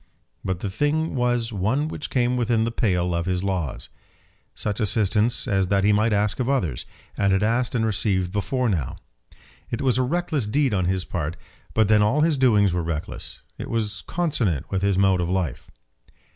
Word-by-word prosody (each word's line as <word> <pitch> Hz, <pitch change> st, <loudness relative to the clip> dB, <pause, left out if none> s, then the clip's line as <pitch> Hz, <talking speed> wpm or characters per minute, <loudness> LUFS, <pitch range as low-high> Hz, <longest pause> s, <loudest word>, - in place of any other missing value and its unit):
But 95 Hz, -2 st, -2 dB
the 100 Hz, -, -2 dB
thing 150 Hz, +8 st, 0 dB
was 120 Hz, -3 st, 0 dB
one 110 Hz, +10 st, 0 dB
which -, -, -5 dB
came 125 Hz, -1 st, +1 dB
within 115 Hz, -2 st, +1 dB
the 115 Hz, -, -1 dB
pale 90 Hz, -6 st, 0 dB
of 85 Hz, +1 st, -1 dB
his 90 Hz, 0 st, -1 dB
laws. 90 Hz, -8 st, -3 dB, 0.7 s
Such 105 Hz, 0 st, -2 dB
assistance 110 Hz, +2 st, +1 dB
as 95 Hz, -4 st, +1 dB
that 100 Hz, 0 st, +2 dB
he 105 Hz, +1 st, +4 dB
might 110 Hz, +2 st, +2 dB
ask 105 Hz, +1 st, +1 dB
of 125 Hz, 0 st, 0 dB
others, 85 Hz, -, -1 dB, 0.3 s
and 100 Hz, -1 st, +2 dB
had 95 Hz, +2 st, +2 dB
asked 120 Hz, +3 st, +1 dB
and 115 Hz, -2 st, +1 dB
received 95 Hz, -4 st, 0 dB
before 125 Hz, +5 st, -1 dB
now. 85 Hz, -, -1 dB, 0.7 s
It 115 Hz, -, -3 dB
was 130 Hz, -2 st, +2 dB
a -, -, +4 dB
reckless 155 Hz, -2 st, -1 dB
deed 135 Hz, +2 st, +1 dB
on 95 Hz, -3 st, +1 dB
his 95 Hz, 0 st, 0 dB
part, 85 Hz, -2 st, -3 dB, 0.4 s
but 110 Hz, -2 st, +4 dB
then 105 Hz, 0 st, +5 dB
all 120 Hz, +9 st, +3 dB
his 155 Hz, -3 st, +2 dB
doings 105 Hz, -7 st, +4 dB
were 90 Hz, -, 0 dB
reckless. 80 Hz, -1 st, -5 dB, 0.2 s
It -, -, -5 dB
was 105 Hz, -4 st, -2 dB
consonant 120 Hz, -, -1 dB
with 95 Hz, -, 0 dB
his 100 Hz, -1 st, +1 dB
mode 95 Hz, -2 st, +3 dB
of 85 Hz, -, -2 dB
life. 90 Hz, -4 st, -2 dB
105 Hz, 190 wpm, -24 LUFS, 95-125 Hz, 0.7 s, then